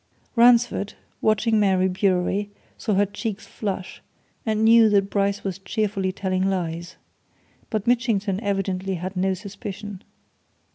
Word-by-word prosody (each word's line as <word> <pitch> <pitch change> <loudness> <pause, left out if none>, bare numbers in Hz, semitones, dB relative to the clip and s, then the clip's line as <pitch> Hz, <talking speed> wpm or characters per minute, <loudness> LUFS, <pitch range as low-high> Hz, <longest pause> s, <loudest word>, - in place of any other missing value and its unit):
Ransford, 235 -3 +4 0.3
watching 220 +1 +2
Mary 190 -2 +3
Bewery, 190 +1 0 0.3
saw 215 -3 -1
her 200 +1 +4
cheeks 210 +1 -5
flush, 195 -3 -5 0.5
and 215 0 +1
knew 225 0 +7
that 200 -1 +2
Bryce 200 0 0
was 195 -1 -3
cheerfully 195 -1 -1
telling 185 0 -1
lies. 175 -2 -3 0.7
But 215 -2 -2
Mitchington 225 -5 +1
evidently 195 -2 -1
had 180 +3 -5
no 190 +1 +1
suspicion. 200 0 -7
200 Hz, 125 wpm, -24 LUFS, 190-215 Hz, 0.7 s, knew